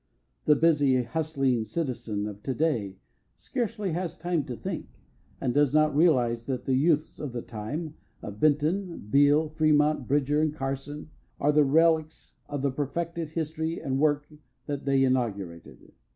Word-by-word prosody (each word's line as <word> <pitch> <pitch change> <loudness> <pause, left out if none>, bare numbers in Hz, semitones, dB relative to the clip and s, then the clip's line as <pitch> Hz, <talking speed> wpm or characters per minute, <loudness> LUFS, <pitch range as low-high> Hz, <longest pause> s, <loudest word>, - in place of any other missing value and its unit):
The 150 - +6
busy, 145 -5 +3
hustling 135 -3 0
citizen 115 -7 -3
of 105 -1 -7
to 130 +3 -3
day 115 -12 -1 0.4
scarcely 230 -6 -3
has 175 0 -3
time 175 -2 -1
to 125 -4 -5
think, - - -5 0.5
and 125 -3 -1
does 145 0 +3
not 155 -1 +3
realize 125 -8 +3
that 130 -2 -3
the 135 - +1
youths 155 +3 +1
of 145 -5 -5
the 120 - -4
time 145 +9 -5 0.3
of 105 0 -7
Benton, 155 - +1
Beal, 145 +2 +4
Fremont, 150 -3 +2
Bridger, 145 +1 +2
and 155 -1 0
Carson 140 +2 -5 0.3
are 145 - +3
the 150 0 +5
relicts 160 +2 +2 0.2
of 145 -2 -3
the 140 - +2
perfected 165 +4 -3
history 160 +1 -3
and 135 0 -2
work 145 -1 +2 0.4
that 145 -2 -4
they 135 -1 +3
inaugurated. 100 -10 -2
145 Hz, 150 wpm, -27 LUFS, 130-155 Hz, 0.5 s, The